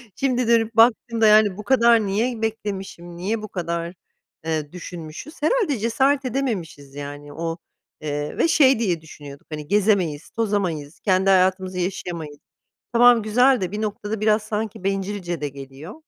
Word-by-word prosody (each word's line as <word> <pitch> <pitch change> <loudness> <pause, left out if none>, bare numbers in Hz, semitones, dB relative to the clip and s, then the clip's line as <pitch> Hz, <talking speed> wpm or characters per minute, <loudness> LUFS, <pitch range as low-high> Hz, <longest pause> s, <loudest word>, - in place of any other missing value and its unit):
Şimdi 250 -3 0
dönüp 230 -1 +2
baktığımda 225 -1 +4
yani 210 -2 +5
bu 210 - -7
kadar 235 -3 +4
niye 225 +4 -1
beklemişim, 195 -6 -4
niye 210 +5 -2
bu 215 - -6
kadar, 170 -2 -4 0.5
eee, 155 -2 -2
düşünmüşüz. 175 - -9
Herhâlde 315 - +1
cesaret 265 +5 +1
edememişiz 185 - -3
yani. 145 0 -8
O, 165 +1 -4 0.4
eee, 145 0 -4
ve - - +3
şey 270 -6 +4
diye 175 -8 0
düşünüyorduk 145 -3 -12
hani 150 -1 -6
gezemeyiz 190 -7 +1
tozamayız 185 -9 -2
kendi 190 0 +2
hayatımızı 185 0 +2
yaşayamayız. 170 -5 -4 0.6
Tamam 240 -1 +6
güzel 245 +3 +3
de 185 0 -2
bir 210 +1 -4
noktada 210 0 -4
biraz 215 0 +3
sanki 215 -3 -4
bencilce 195 -4 -3
de 145 - -2
geliyor. 135 +3 -10
195 Hz, 145 wpm, -22 LUFS, 165-225 Hz, 0.6 s, Tamam